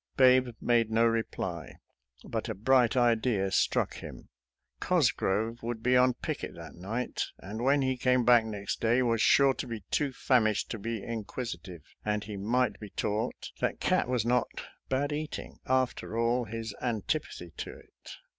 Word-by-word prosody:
Babe 130 -1 +6
made 115 -2 +2
no 115 +1 +3
reply, 105 -7 -2 0.5
but - - -4
a - - -3
bright 125 +3 +3
idea 115 -5 +2
struck - - +1
him; - - -10 0.5
Cosgrove 110 +4 +1
would 115 -1 -4
be 125 +1 +3
on 125 0 +4
picket - - -5
that - - -10
night, 110 +8 -3
and 105 +5 -7
when 140 +1 +3
he 130 -1 0
came 125 -1 +2
back 120 -1 +6
next 105 -3 -4
day 120 +3 +3
was 115 -2 +1
sure 140 -1 +5
to - - -5
be 115 -3 -5
too 145 -2 +1
famished 110 -5 +1
to 115 - -4
be 110 0 -4
inquisitive, 105 - -6 0.2
and 105 0 -1
he 105 -1 -7
might 120 +6 0
be 105 - -8
taught 105 +5 -3
that - - -1
cat - - +2
was 125 -3 +1
not 125 +1 +2 0.4
bad 140 +2 0
eating, 150 +1 -5
after 130 -3 0
all 120 +1 +1
his 115 -1 -5
antipathy 115 - -2
to - - -5
it. - - -14
115 Hz, 165 wpm, -29 LUFS, 110-125 Hz, 0.5 s, Babe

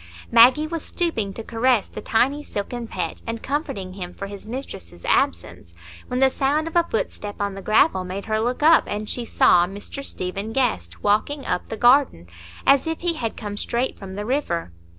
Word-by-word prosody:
Maggie 250 +6 +7
was 330 0 -4
stooping 230 - -1
to 225 - -6
caress 235 -1 +1
the - - -8
tiny 275 +6 +1
silken 235 +1 -5
pet, - - -4
and 230 0 -4
comforting 205 - -3
him 180 -2 -7
for 200 - -5
his 200 +1 -9
mistress's 85 - -7
absence, 85 0 0 0.3
when 250 - -2
the 265 0 +5
sound 290 +5 0
of 330 - -7
a 340 -1 +3
footstep 205 -2 -3
on 200 -1 -1
the 195 - -7
gravel 215 -1 +3
made 185 +2 -5
her 215 0 0
look 245 +5 -1
up, 325 +2 +6
and 210 +1 -4
she 245 - -2
saw 175 -5 +4
Mr 205 +8 -7
Stephen 195 0 -4
Guest 85 - -1
walking 265 +7 +1
up - - -2
the 220 - -4
garden, 245 - +4 0.4
as 275 +3 +4
if 325 0 -3
he 345 -1 +1
had 235 -8 -4
come 205 -2 -5
straight 235 +4 -1
from 190 -1 -8
the 205 +1 -4
river. 210 - -1
225 Hz, 190 wpm, -23 LUFS, 200-275 Hz, 0.4 s, Maggie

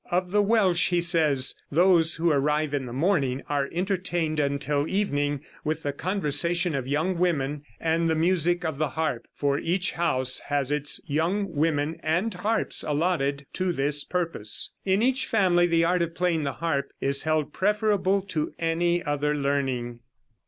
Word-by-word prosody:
Of 180 0 -1
the 210 +1 +3
Welsh 200 -5 +3
he 175 -1 +2
says: 155 -6 +2 0.2
"Those 170 +1 +4
who 165 0 +1
arrive 150 +1 +1
in 135 -3 -2
the - - -7
morning 135 -2 0
are 140 -1 -1
entertained 175 -3 -1
until 145 +1 0
evening 145 -8 -1 0.2
with 155 +1 -2
the 145 - -2
conversation 170 0 0
of 135 -3 -3
young 160 +6 -1
women, 150 -5 0 0.2
and 165 0 +1
the 160 - +2
music 175 +1 +2
of 155 -3 -3
the 155 -2 0
harp, 150 -4 -3
for 140 0 0
each 180 +3 0
house 130 -7 +1
has 145 -1 -1
its 150 -1 0
young 170 +6 -1
women 155 +1 0
and 175 +8 0
harps 210 +5 0
allotted 145 -3 -1
to 185 -1 0
this 145 -1 0
purpose. 165 - -1
In 195 +3 +2
each 265 +3 +1
family 180 -5 +3
the 165 -1 +2
art 175 +1 +2
of 165 0 -2
playing 170 -3 0
the 140 - -2
harp 145 -1 -2
is 140 0 +2
held 155 -2 -1
preferable 200 -1 +1
to 160 -6 -3
any 170 +1 0
other 150 -1 -1
learning." 135 -4 -2
160 Hz, 165 wpm, -26 LUFS, 145-180 Hz, 0.2 s, Those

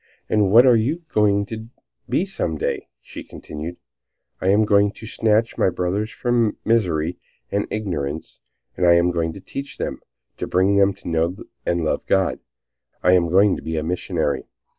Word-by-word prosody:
"And 105 -3 +2
what 115 +6 +7
are 125 -2 +6
you 140 +10 0
going 100 -1 +3
to 110 +1 -7 0.4
be 185 - +1
some 85 - -3
day?" - - -2
she - - -9
continued. 80 +3 -8 0.6
"I 95 - -1
am 105 +3 +4
going 100 0 +4
to 110 - -11
snatch 110 +1 +1
my - - +4
brothers 95 +4 -1
from 120 -2 0
misery 90 -7 +1 0.3
and 100 0 0
ignorance. 80 -8 -4 0.4
I 90 -1 +6
am 85 +1 +4
going 85 -1 -1
to - - -9
teach 140 +8 -7
them, - - -3 0.4
to - - -4
bring 95 +2 +2
them 100 0 +4
to - - -13
know 85 +1 0 0.3
and 85 0 +1
love - - -1
God. 95 -1 +2 0.6
I 90 - +5
am 85 -2 +3
going 95 +3 +4
to - - -8
be 80 0 -3
a 75 - -1
missionary." 80 -4 -1
95 Hz, 175 wpm, -22 LUFS, 85-110 Hz, 0.6 s, what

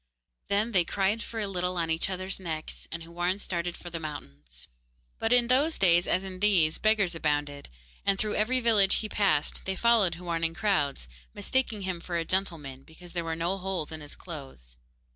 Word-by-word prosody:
Then 210 +4 +1
they 185 -5 +4
cried 200 +5 0
for 230 -1 -5
a 210 - -1
little 180 -1 -2
on 165 -1 0
each 160 +3 0
other's 185 +1 -3
necks, 160 -4 -6
and 165 0 -5
Houarn 175 +3 -1
started 175 -3 -3
for 175 - -10
the 165 - -4
mountains. 70 - -9 0.5
But 225 - 0
in 245 -1 +6
those 275 +6 +3
days, 175 -2 +4
as 185 - +1
in 185 -1 -7
these, 185 -6 +4
beggars 215 -4 +3
abounded, 145 -3 -2 0.3
and 200 -1 +2
through 210 +1 -1
every 250 +5 +2
village 210 -5 +5
he 215 - -1
passed 175 -9 +1
they 190 - -1
followed 220 -6 +3
Houarn 170 -1 -3
in 165 0 0
crowds, 150 - 0 0.3
mistaking 230 -6 -1
him 185 -2 -3
for 175 0 -3
a 165 - -1
gentleman, 160 -8 -2
because 170 +4 -14
there 170 -1 -1
were 165 0 -2
no 175 +4 -1
holes 180 -5 -3
in 160 -1 -6
his 145 - -8
clothes. 135 - -10
180 Hz, 195 wpm, -28 LUFS, 160-200 Hz, 0.5 s, in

